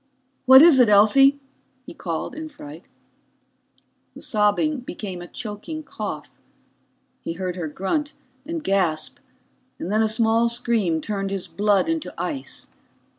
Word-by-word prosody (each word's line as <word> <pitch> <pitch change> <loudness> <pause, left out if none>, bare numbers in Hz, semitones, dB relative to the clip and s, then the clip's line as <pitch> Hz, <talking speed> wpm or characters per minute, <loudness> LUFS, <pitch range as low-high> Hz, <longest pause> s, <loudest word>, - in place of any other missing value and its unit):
"What 265 +2 +10
is 320 -6 +7
it, 245 -3 +5
Elsie?" 270 +8 +5 0.5
he - - -10
called - - -5
in 315 0 -7
fright. 295 0 -12 1.3
The - - -11
sobbing 215 +8 +1
became 200 -7 -7
a 175 - -9
choking 240 - -7
cough. - - -7 0.8
He 165 - -4
heard 180 0 -4
her 175 -3 -4
grunt 240 - -3 0.3
and 325 +2 -5
gasp, 180 -6 0 0.6
and 180 - -5
then 215 +1 +2
a 220 - +3
small 225 +1 +2
scream 225 -9 0
turned 195 +2 -3
his 195 -2 -3
blood 200 - +1
into 325 -1 -2
ice. 280 -4 -5
220 Hz, 135 wpm, -23 LUFS, 195-285 Hz, 1.3 s, What